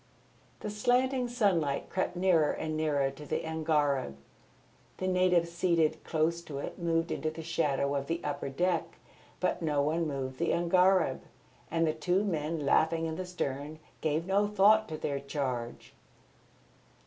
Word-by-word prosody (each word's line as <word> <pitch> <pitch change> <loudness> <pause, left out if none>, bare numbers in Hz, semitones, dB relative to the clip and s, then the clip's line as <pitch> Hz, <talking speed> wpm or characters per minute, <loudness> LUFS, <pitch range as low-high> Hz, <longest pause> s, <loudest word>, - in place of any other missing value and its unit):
The 210 - -4
slanting 250 +4 +1
sunlight 190 - 0
crept 185 -1 -1
nearer 175 -4 +3
and 155 0 -3
nearer 145 -3 +1
to 140 +2 -11
the 150 - -3
angareb. 150 - 0 0.8
The 185 - -2
natives 180 -2 +2
seated 170 -3 +1
close 165 +1 0
to 145 - -6
it 140 - -6
moved 165 -1 0
into 155 - -1
the 160 +1 -8
shadow 150 -4 0
of 140 -1 -2
the 165 +2 -1
upper 145 -1 -3
deck, 175 +4 -1 0.4
but - - 0
no 150 -3 0
one 160 +3 0
moved 130 -2 -4
the 170 - +1
angareb, 180 +1 +3 0.5
and 165 0 +1
the 155 - +1
two 180 +5 +1
men 160 -5 -2
laughing 160 +3 +2
in 160 -1 -3
the 185 +2 -5
stern 150 -3 -4 0.2
gave 155 +1 0
no 200 +2 +2
thought 210 +2 +4
to 155 - -4
their 140 -2 -2
charge. 130 -4 -4
160 Hz, 155 wpm, -30 LUFS, 145-180 Hz, 0.8 s, thought